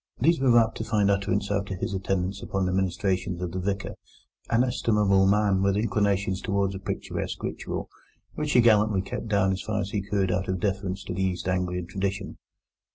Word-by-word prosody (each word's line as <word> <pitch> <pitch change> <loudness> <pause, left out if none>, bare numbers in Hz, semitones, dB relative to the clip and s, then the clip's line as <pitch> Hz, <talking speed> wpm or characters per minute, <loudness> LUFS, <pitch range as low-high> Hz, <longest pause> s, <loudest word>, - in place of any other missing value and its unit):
These 165 +6 +3
were 125 -3 +5
apt 115 -1 +3
to - - -1
find 105 -3 +2
utterance 100 0 0
after 100 -1 -1
his 95 - -3
attendance 95 0 -2
upon 95 -1 -1
the 90 - 0
ministrations 95 -1 -1
of 90 -1 -3
the 95 - -3
Vicar, 100 +2 -2 0.6
an 115 +1 +3
estimable 105 -6 +2
man 100 -1 +3
with 100 0 +2
inclinations 100 -3 0
towards 100 -1 0
a 95 - -5
picturesque - - -4
ritual, - - -4 0.5
which 150 -1 -2
he 125 - +6
gallantly 105 -4 +4
kept 105 - -5
down 100 -3 +2
as 95 - -2
far 110 -1 -2
as 100 0 -3
he 105 -3 -1
could 95 -1 0
out 95 +2 -1
of 95 -1 -1
deference 95 0 -2
to - - -5
East 95 0 -1
Anglian 90 -1 -1
tradition. 100 +2 -4
100 Hz, 190 wpm, -26 LUFS, 95-105 Hz, 0.6 s, he